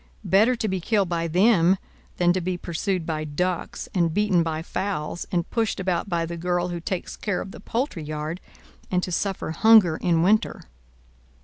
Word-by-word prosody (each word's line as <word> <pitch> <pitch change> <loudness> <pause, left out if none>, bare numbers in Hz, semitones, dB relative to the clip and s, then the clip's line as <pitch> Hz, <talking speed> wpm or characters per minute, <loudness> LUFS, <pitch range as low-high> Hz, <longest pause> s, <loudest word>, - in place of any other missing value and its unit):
Better 205 +7 +4
to 225 -2 -2
be 190 -2 -2
killed 200 -1 +1
by 170 -1 -1
them 185 +1 +4 0.4
than 175 0 +3
to 185 - -1
be 180 +1 -2
pursued 175 +1 -2
by 155 -1 -2
ducks, 175 +4 -3
and 170 -3 +2
beaten 195 -1 +2
by 160 -1 -2
fowls, 175 -3 -3
and 175 -2 0
pushed 225 -4 0
about 185 0 -1
by 170 -2 0
the 170 +1 -6
girl 175 +1 -1
who 175 -1 -4
takes 175 +2 -4
care 200 -4 -2
of 190 - -6
the - - -11
poultry 230 - -3
yard, 155 +3 -5 0.5
and 180 -1 0
to 180 - -3
suffer 190 -2 -2
hunger 210 -4 +6
in 165 -2 +2
winter!" 215 +4 +2
180 Hz, 185 wpm, -24 LUFS, 165-195 Hz, 0.5 s, hunger